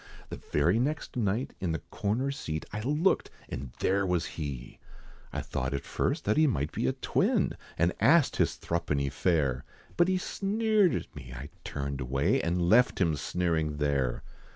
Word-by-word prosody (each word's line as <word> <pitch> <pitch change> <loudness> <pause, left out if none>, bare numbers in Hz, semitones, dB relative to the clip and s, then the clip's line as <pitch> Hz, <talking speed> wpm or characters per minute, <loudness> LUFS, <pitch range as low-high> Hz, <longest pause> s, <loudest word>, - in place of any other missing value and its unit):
The - - -7
very 85 +9 +3
next 150 +4 -2
night, 115 +1 0
in 90 -3 -1
the 80 - -4
corner 120 +7 0
seat, 80 - -4
I 105 - -2
looked, 150 - +2 0.2
and 65 +1 -5
there 100 +1 +2
was 90 -3 +1
he! 70 -6 -6 0.5
I - - -3
thought 65 +1 -2
at 70 - -3
first - - -1
that 105 - +2
he 155 0 +5
might 75 - 0
be - - -1
a 65 - +2
twin, - - +1 0.2
And 85 +2 +2
asked 160 0 +4
his - - +2
thruppeny 75 -5 -1
fare, 70 -6 +1 0.3
But 175 - +5
he 185 0 +2
sneered 205 +1 +2
at - - -5
me, 65 0 -9
I 70 +4 -7
turned 70 -1 -4
away, 65 +2 +1
And 85 +1 0
left 125 +6 +5
him 85 -5 +2
sneering 80 -1 -1
there! 70 -4 0
85 Hz, 175 wpm, -29 LUFS, -, 0.5 s, he